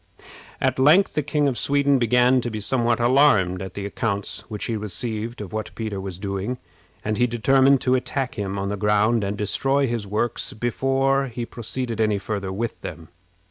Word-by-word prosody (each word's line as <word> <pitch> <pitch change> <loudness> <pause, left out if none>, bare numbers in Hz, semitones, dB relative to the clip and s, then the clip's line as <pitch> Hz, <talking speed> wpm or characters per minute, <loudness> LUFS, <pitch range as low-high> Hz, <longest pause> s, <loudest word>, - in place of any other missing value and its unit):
At 130 0 0
length 155 +9 +5
the 150 - +1
King 150 0 0
of 130 -3 -1
Sweden 140 -1 +2
began 125 +2 +4
to 120 - -3
be 110 -2 -4
somewhat 120 +2 +1
alarmed 120 -8 +4
at 95 -1 -7
the 100 - -4
accounts 100 0 -2
which 105 -2 -4
he 115 - -2
received 110 +2 -4
of 100 -2 -8
what 110 0 -3
Peter 110 -4 -4
was 95 -2 -6
doing, 100 +5 -3 0.5
and 110 +1 -1
he 125 - +4
determined 135 +3 +3
to 130 - +2
attack 130 +1 -1
him 100 -2 -4
on 100 0 -2
the 105 - -2
ground, 105 +2 +2
and 100 +1 -2
destroy 135 +7 +1
his 115 -5 -3
works 110 +3 -2
before 135 +4 +1
he 120 -1 -5
proceeded 120 0 -4
any 105 -2 +2
farther 100 -1 -4
with 115 +5 -4
them. 80 -2 -8
115 Hz, 185 wpm, -23 LUFS, 105-130 Hz, 0.5 s, length